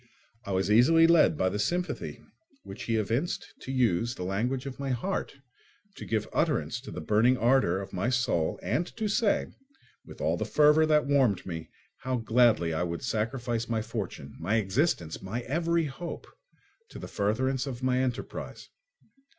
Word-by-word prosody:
I - - -3
was 95 +2 0
easily 160 +9 +6
led 165 -2 +5
by 95 - +2
the 105 - -3
sympathy 175 +10 -2 0.4
which - - -8
he 115 - 0
evinced 115 - -2
to 130 - -6
use 120 -2 +1
the - - -5
language 120 +8 -1
of 135 -1 -7
my 140 -1 -3
heart, 135 +7 -2 0.6
to - - -9
give 110 -1 -1
utterance 145 -6 0
to 135 - -10
the - - -6
burning 115 +5 +3
ardour 120 -7 +3
of 100 0 -8
my 95 +6 0
soul 120 -11 0
and 170 +3 0
to 220 -1 -1
say, 205 0 +2 0.6
with - - -13
all - - 0
the - - -2
fervour 150 +1 +4
that 150 -1 +3
warmed 135 -9 +2
me, 80 -3 -6 0.3
how 130 -1 -2
gladly 115 -7 +3
I 80 - -1
would 85 -1 -3
sacrifice 115 0 -2
my 110 -2 0
fortune, 100 - -6
my 95 +7 0
existence, 100 - 0
my 105 +6 -4
every 165 +6 0
hope, 150 +5 -6 0.6
to - - -10
the - - -7
furtherance 130 +6 0
of 130 -1 -6
my 130 0 +2
enterprise. 130 -2 -4
120 Hz, 170 wpm, -28 LUFS, 105-140 Hz, 0.6 s, easily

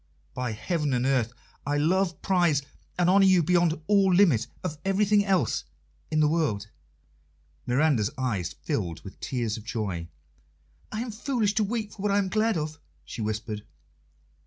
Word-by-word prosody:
"By 125 -3 -3
heaven 150 - -1
and 125 +1 0
earth, 130 -4 +2 0.3
I 145 +1 0
love, 175 +3 +1
prize, 175 -7 +2 0.3
and 175 -1 +2
honour 195 +2 +6
you 185 -3 +5
beyond 170 -1 +2
all 195 -1 +4
limit 165 - +4 0.2
of 155 -5 -4
everything 205 +1 +3
else 195 -3 +1 0.5
in 155 - +2
the 150 - +5
world!" 140 -10 0 1.0
Miranda's 125 -4 +2
eyes 105 -10 -2
filled 85 -2 -2
with 95 - -11
tears 115 -4 -2
of 110 - -9
joy. 100 -7 -3 0.8
"I 215 - -3
am 240 -1 -4
foolish 220 -2 0
to 215 - +2
weep 215 0 -2
for 195 - -10
what 205 0 +1
I 200 - +3
am 195 -2 +1
glad 215 0 +1
of," 155 0 -4 0.3
she - - -6
whispered. 105 0 -3
155 Hz, 160 wpm, -27 LUFS, 120-195 Hz, 1.0 s, honour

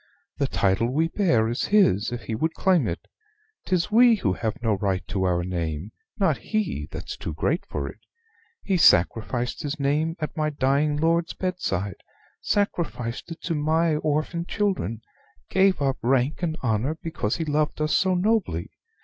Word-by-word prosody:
"The - - +2
title 100 +5 +1
we 160 +4 +1
bear 145 - +2
is 120 +1 -1
his, 150 - +3
if 120 -1 -5
he 105 - -4
would 160 +9 -1
claim 180 - +3
it. 85 - -5 0.6
'Tis 180 +1 0
we 235 +1 +7
who 105 - 0
have 110 +6 -3
no 110 -2 +2
right 95 -3 -1
to 95 -1 0
our 90 -1 +1
name: 85 +1 -3 0.3
not 170 -9 +2
he 205 - -2
that's - - -6
too 80 - -6
great 165 - 0
for - - -3
it. - - -9 0.6
He 195 -2 +1
sacrificed 120 - +3
his 145 +1 -4
name 150 +4 +1
at 155 -1 -4
my 155 -1 0
dying 145 +1 +1
lord's 165 +2 +1
bedside 100 - -2 0.4
sacrificed 170 - -1
it 165 - -9
to 170 - -1
my 160 +1 +2
orphan 155 +3 -1
children; 190 - -1 0.5
gave 190 -1 +4
up 135 -1 +1
rank 130 +5 +1
and 160 -2 -1
honor 125 +6 0
because 135 -10 -2
he 165 - -2
loved 150 0 0
us 155 0 0
so 190 -1 +2
nobly. 185 - 0
150 Hz, 165 wpm, -25 LUFS, 110-170 Hz, 0.6 s, we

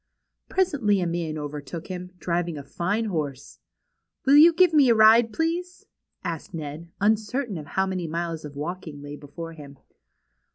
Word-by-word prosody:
Presently 285 - +2
a 180 - 0
man 165 -2 -2
overtook 150 +2 -6
hiiU; 180 -1 -7
driving 175 -2 -2
a 140 - -7
fine 185 +10 -1
horse. 145 - -4 0.7
^^Will 285 +2 +8
you 335 +2 +9
give 345 0 +4
me 285 -5 +6
a 230 - +5
ride; 225 +1 +6
please?" 340 +6 -2 0.4
asked 170 -1 -5
Ned; 155 +2 -6
un 210 +2 +4
certain 220 -1 -4
how 190 +7 -1
many 185 -3 -3
miles 165 0 -3
of 145 -1 -9
walking 155 -1 -6
lay 145 0 -7
before 165 +3 -8
him. 140 -3 -12
175 Hz, 160 wpm, -25 LUFS, 155-220 Hz, 0.7 s, you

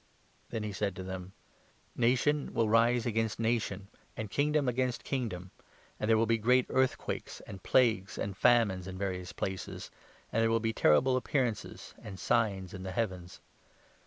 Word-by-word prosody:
Then 110 - -3
he 105 -1 -4
said 100 0 -1
to 95 - -6
them: 95 -1 -5
10 95 - -15 0.3
" - - -33
' - - -35
Nation 145 +4 +1
will 115 -1 +2
rise 115 +2 +3
against 115 -2 -1
nation 110 -4 -1 0.3
and 110 -2 -5
kingdom 150 -1 +1
against 125 0 0
kingdom,' 105 -9 -3 0.5
and 105 - -1
there 110 - +5
will 115 - +3
be 115 0 +2
great 125 +3 +4
earthquakes, 130 0 -1
and 95 - -10
plagues 110 -5 +2
n - - -1
and 100 - -8
famines 105 -6 +3
in 95 0 -6
various 90 -2 -3
places, 95 -1 -5 0.4
and 115 - +1
there 115 - +3
will 115 0 +3
be 115 0 -1
terrible 125 - +4
appearances 125 -4 -2
and 100 -3 -8
signs 100 -6 0
in 95 - -7
the 95 - -5
heavens. 95 -5 -3
110 Hz, 180 wpm, -31 LUFS, 95-120 Hz, 0.5 s, there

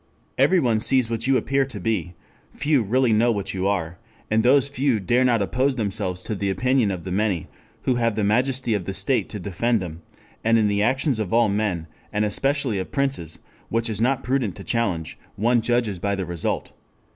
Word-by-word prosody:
Everyone 125 -12 +3
sees 125 +1 +2
what 115 +1 -1
you 135 -1 +4
appear 135 +2 +1
to 130 -6 -7
be, 90 -3 -2 0.4
few 145 -3 +2
really 120 +3 +2
know 115 +3 +3
what 100 -3 -2
you 95 0 -1
are, 90 -4 -2 0.3
and 110 +1 +4
those 135 +3 +4
few 135 -4 0
dare 120 +7 +2
not 120 -5 +3
oppose 130 +6 0
themselves 100 -5 -2
to - - -3
the 100 -1 -2
opinion 125 +4 +2
of 90 -3 -4
the 95 - -6
many, 100 -3 0 0.4
who 130 - +2
have 115 -2 +1
the 110 - 0
majesty 125 +3 +1
of 100 -4 -2
the 95 - -4
state 135 -3 0
to 105 - -6
defend 105 +5 0
them; 85 -3 -7 0.4
and 115 +1 +4
in 110 -2 +3
the 100 0 +1
actions 130 +2 +1
of 105 -5 -3
all 115 -1 +4
men, 100 -5 -1 0.3
and 105 0 +1
especially 135 0 0
of 95 - -5
princes, 135 - -2 0.3
which 115 +1 0
it - - -1
is 105 0 -3
not 135 +2 +1
prudent 125 -7 0
to 95 - -9
challenge, 95 -10 -2 0.2
one 120 +3 +2
judges 115 -5 0
by 100 +2 -1
the 95 -1 -3
result.... 85 -1 -2
110 Hz, 205 wpm, -23 LUFS, 100-125 Hz, 0.4 s, you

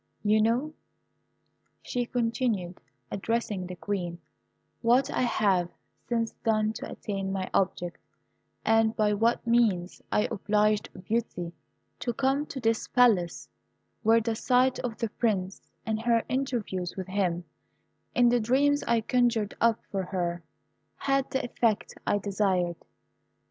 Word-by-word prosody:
"You 215 +1 +4
know," 245 +8 +1 1.1
she 245 -1 -2
continued, 230 -7 -1 0.3
addressing 205 -3 -2
the 180 - -6
Queen, 180 -3 -3 0.6
"what 255 +4 +3
I - - 0
have 195 -7 +2 0.4
since 230 -2 0
done 215 -1 +2
to - - -6
attain 195 -2 -4
my 190 -1 -2
object, 175 -2 0 0.7
and 225 0 +3
by 210 -1 +2
what 230 +4 +1
means 220 -7 +2
I 210 - +3
obliged 210 +1 +1
Beauty 180 -6 -2 0.5
to 240 - -2
come 275 +4 +1
to 270 - -6
this 225 -2 0
Palace, 220 -9 +3 0.5
where 225 +1 +5
the 225 0 -1
sight 255 +3 +2
of 235 -3 -4
the 230 -2 -2
Prince, 200 -4 -2 0.2
and 220 0 -1
her 230 -1 +2
interviews 235 -9 -2
with 190 -1 -4
him, 180 -3 0 0.7
in 245 -1 +5
the 245 0 +3
dreams 280 +6 +2
I 235 -1 +3
conjured 230 -3 +1
up 230 -1 +3
for 195 - -1
her, 175 -2 -2 0.5
had 275 -1 0
the 265 - -1
effect 230 -3 0
I - - +3
desired. 190 -4 0
220 Hz, 135 wpm, -28 LUFS, 195-240 Hz, 1.1 s, where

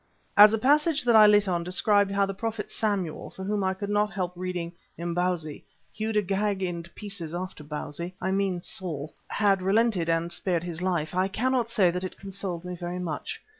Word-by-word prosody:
As 210 +1 +10
a 225 - +2
passage 300 +5 +3
that 240 -2 +4
I 215 -1 +9
lit 205 -1 +5
on 175 -2 0
described 200 +3 +2
how 200 0 +2
the 195 - -4
prophet 220 +1 -4
Samuel 200 -7 -2
for 190 - -9
whom 205 +1 -1
I 190 0 0
could 200 +1 -5
not 210 0 +2
help 180 -2 -3
reading 180 -1 -4 0.3
"Imbozwi," 170 -2 -2 0.3
hewed 220 0 -2
Agag 200 0 0
in 175 -2 -2
pieces 195 -6 -5
after 185 -3 -5
Bausi 150 +4 -5
I 190 +1 -1
mean 190 -2 0
Saul 155 -5 -5
had 200 -2 +2
relented 195 -3 +2
and 165 +1 0
spared 175 -3 0
his 175 -1 -5
life, 175 -4 -1
I 185 +1 +2
cannot 245 +3 0
say 200 -7 +3
that 180 +1 -4
it 185 - -6
consoled 190 -3 -6
me 180 - -4
very 175 +1 -5
much. 180 - -4
190 Hz, 195 wpm, -27 LUFS, 175-210 Hz, 0.3 s, As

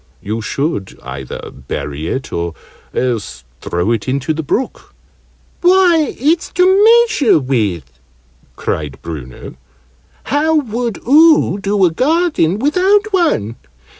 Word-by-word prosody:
"You 110 +3 -4
should 110 - -3
either 65 0 -7
bury 70 +3 -6
it, 130 +7 -4
or 85 -1 -3 0.4
else 110 - -3 0.2
throw 85 +6 -1
it 115 -1 -2
into 140 +4 -1
the 160 - -3
brook." 225 - -4 0.7
"Why, 355 -4 +3
it's 320 +7 +1
to 360 - +3 0.2
measure 455 - +4
with!" 100 - -2 0.6
cried 75 -4 -4
Bruno. 70 -7 -8 0.7
"How 310 +3 +1
ever 235 -7 -6
would 235 -3 -2
oo 300 - +5
do 200 -1 +1
a 175 - +2
garden 290 - +1
without 380 - +2
one? 210 - 0
165 Hz, 120 wpm, -16 LUFS, -, 0.7 s, oo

